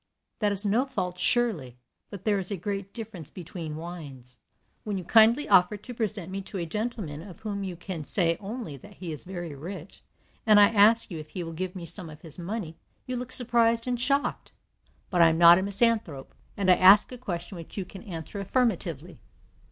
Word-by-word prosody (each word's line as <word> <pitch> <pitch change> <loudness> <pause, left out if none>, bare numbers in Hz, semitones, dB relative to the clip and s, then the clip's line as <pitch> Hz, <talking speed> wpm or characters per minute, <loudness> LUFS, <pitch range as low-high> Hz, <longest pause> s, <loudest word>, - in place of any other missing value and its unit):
That 210 -2 +1
is 200 +1 +4
no 230 +7 +2
fault, 180 -9 -4
surely, 180 - 0 0.3
but 200 -3 -9
there 205 -2 +2
is 185 - -5
a 200 - -3
great 195 +2 -4
difference 215 - -8
between 165 -3 -7
wines. 145 -7 -9 0.4
"When 205 -2 -3
you 185 - -5
kindly 230 - +5
offer 180 +4 +4
to 245 +5 -10
present 210 -6 -3
me 195 +1 -4
to 195 +1 -8
a 170 - -2
gentleman 205 -5 -4
of 180 0 -12
whom 205 -2 -4
you 185 -2 -5
can 170 -2 -6
say 170 +1 +2
only 210 - -6
that 205 +6 -15
he 175 -3 -7
is 150 - -7
very 175 -4 -6
rich, 170 +5 -9 0.4
and 215 -2 +6
I 205 0 +7
ask 220 0 +4
you 165 - -5
if 155 0 -10
he 180 - -5
will 165 0 -7
give 185 +3 -4
me 175 -2 -6
some 170 +1 +1
of 155 0 -12
his 165 -1 -12
money, 175 -2 -5 0.3
you 255 - -4
look 250 +1 -5
surprised 235 -2 +3
and 245 -1 -2
shocked. 280 +2 -1 0.6
But 180 -2 +3
I 165 - +7
am 160 - 0
not 170 +1 +8
a - - -1
misanthrope, 200 - 0 0.2
and 190 -2 +3
I 180 - +5
ask 195 +5 +7
a 250 - -7
question 180 -5 -5
which 165 +4 -11
you 195 - -2
can 190 +1 -11
answer 180 -1 -7
affirmatively. 180 - -1
190 Hz, 205 wpm, -27 LUFS, 170-215 Hz, 0.6 s, not